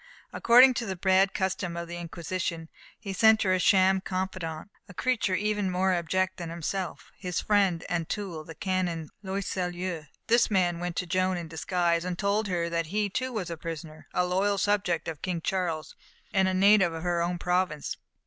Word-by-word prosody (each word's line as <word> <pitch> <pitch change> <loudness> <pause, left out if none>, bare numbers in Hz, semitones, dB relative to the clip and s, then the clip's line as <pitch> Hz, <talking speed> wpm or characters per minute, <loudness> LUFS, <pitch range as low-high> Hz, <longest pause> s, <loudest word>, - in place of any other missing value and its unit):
According 250 +2 +7
to 235 -2 -3
the 190 - -2
bad 190 +2 +3
custom 185 -2 -2
of 170 0 -4
the 175 +1 -6
Inquisition, 170 -1 -4 0.3
he 195 -2 -5
sent 220 +3 +5
her 185 -2 +2
a 185 - +2
sham 190 0 +4
confidant, 185 -2 -4 0.2
a 190 - -12
creature 230 -6 +1
even 210 -1 0
more 185 +1 +1
abject 185 +2 0
than 170 -2 -5
himself 170 -1 -4
his 180 -3 -2
friend 195 -5 +2
and 170 -2 -2
tool, 185 -7 -4
the 160 +1 -10
Canon 180 -4 -2
Loyseleur. 180 -4 -3 0.2
This 235 +1 +4
man 180 -4 +1
went 175 0 -3
to - - -1
Joan 185 +1 +1
in 170 -1 -5
disguise, 170 +1 0
and 180 -1 -3
told 205 +2 0
her 175 -3 -1
that 170 -1 -1
he, 205 +4 0
too, 255 +4 -2
was 195 -7 -3
a 165 - -4
prisoner, 155 -1 -7
a 180 - +1
loyal 195 +3 +1
subject 190 -5 0
of 160 -3 -5
King 180 -3 -2
Charles, 165 -3 -2 0.4
and 190 -1 +3
a 190 - +1
native 195 -2 +5
of 165 0 -6
her 175 -1 0
own 175 +1 -1
province. 180 -4 -1
180 Hz, 185 wpm, -28 LUFS, 170-195 Hz, 0.4 s, According